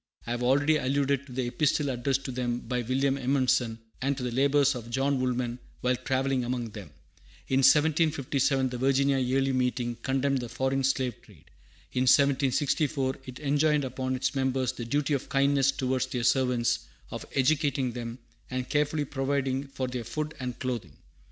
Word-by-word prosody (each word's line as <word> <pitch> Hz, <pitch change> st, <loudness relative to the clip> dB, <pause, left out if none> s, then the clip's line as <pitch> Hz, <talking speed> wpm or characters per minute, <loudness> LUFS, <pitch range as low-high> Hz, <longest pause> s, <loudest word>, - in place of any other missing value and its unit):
I 115 Hz, -, -4 dB
have 120 Hz, 0 st, -2 dB
already 145 Hz, +5 st, +3 dB
alluded 140 Hz, 0 st, 0 dB
to -, -, -12 dB
the 125 Hz, 0 st, -2 dB
epistle 145 Hz, +3 st, +1 dB
addressed 135 Hz, +2 st, -1 dB
to 130 Hz, -, -3 dB
them 125 Hz, -1 st, -2 dB
by 125 Hz, +1 st, -2 dB
William 135 Hz, +3 st, 0 dB
Edmondson, 125 Hz, -3 st, +1 dB, 0.2 s
and 135 Hz, +1 st, 0 dB
to 130 Hz, -, -4 dB
the 125 Hz, -, -2 dB
labors 140 Hz, +2 st, +3 dB
of 120 Hz, -2 st, -7 dB
John 135 Hz, +2 st, +1 dB
Woolman 125 Hz, -1 st, -1 dB, 0.2 s
while 125 Hz, 0 st, +2 dB
travelling 130 Hz, 0 st, 0 dB
among 120 Hz, -1 st, -2 dB
them. 100 Hz, -6 st, -9 dB, 0.6 s
In 135 Hz, -, +3 dB
1757 140 Hz, -2 st, +3 dB
the 125 Hz, -1 st, -5 dB
Virginia 135 Hz, +1 st, +2 dB
Yearly 135 Hz, +1 st, +1 dB
Meeting 125 Hz, -1 st, 0 dB
condemned 135 Hz, +2 st, 0 dB
the 120 Hz, -1 st, -6 dB
foreign 135 Hz, +2 st, -1 dB
slave 130 Hz, -3 st, 0 dB
trade. -, -, -20 dB, 0.4 s
In 130 Hz, 0 st, +1 dB
1764 140 Hz, 0 st, +2 dB
it 130 Hz, -1 st, -8 dB
enjoined 145 Hz, 0 st, +2 dB
upon 130 Hz, 0 st, -2 dB
its 130 Hz, +1 st, -1 dB
members 130 Hz, -2 st, 0 dB
the 120 Hz, -, -7 dB
duty 145 Hz, +4 st, 0 dB
of 140 Hz, -, -2 dB
kindness 140 Hz, 0 st, +3 dB
towards 130 Hz, -1 st, -1 dB
their 125 Hz, -2 st, -3 dB
servants, 120 Hz, -2 st, +2 dB, 0.3 s
of -, -, -5 dB
educating 135 Hz, -2 st, +2 dB
them, 120 Hz, 0 st, -6 dB, 0.3 s
and 125 Hz, -1 st, -3 dB
carefully 150 Hz, 0 st, 0 dB
providing 135 Hz, 0 st, -1 dB
for 135 Hz, -1 st, -4 dB
their 125 Hz, -1 st, -4 dB
food 155 Hz, +5 st, -4 dB
and 125 Hz, -2 st, -4 dB
clothing. 120 Hz, -, -4 dB
130 Hz, 170 wpm, -28 LUFS, 125-140 Hz, 0.6 s, already